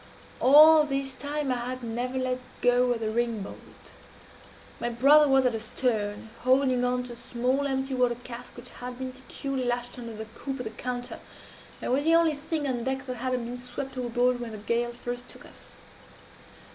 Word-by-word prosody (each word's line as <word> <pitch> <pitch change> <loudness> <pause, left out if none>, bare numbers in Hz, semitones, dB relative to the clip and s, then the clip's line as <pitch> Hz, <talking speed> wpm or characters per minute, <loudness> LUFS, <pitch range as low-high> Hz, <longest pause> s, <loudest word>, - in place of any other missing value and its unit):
All 305 +3 +8
this 275 -2 -2
time 285 +1 -3
I 250 - +1
had 250 +1 -4
never 245 +3 -3
let 255 -1 -1 0.2
go 245 0 +4
of 235 -2 -1
the 215 -1 -1
ring 230 -2 0
bolt. - - -12 0.9
My 240 - -1
brother 280 +6 +6
was 270 -1 +4
at 230 -3 +1
stern, 220 -2 -2
holding 255 -1 +3
on 250 0 +1
to 245 -1 -8
a - - -10
small 250 +4 -1
empty 265 0 -1
water 250 -2 +2
cask 245 0 -9
which 245 +1 -10
had 250 0 -7
been 260 0 -5
securely 265 0 -4
lashed 245 0 -2
under 230 -2 -7
the 220 +1 -6
coop 265 +5 -6
of - - -3
the 220 - -5
counter, 245 +2 -5 0.6
and - - -1
was 270 +3 +2
the 330 +1 +5
only 335 -2 +4
thing 300 0 -3
on 245 -3 -1
deck 265 +1 -2
that 255 -1 -5
had 255 +2 -2
not 250 -2 -1
been 245 +1 -6
swept 250 +2 -6
overboard 245 0 +1
when 235 -2 -6
the - - -6
gale 235 +3 -1
first 245 +1 -6
took - - -13
us. - - -14
250 Hz, 195 wpm, -27 LUFS, 240-265 Hz, 0.9 s, All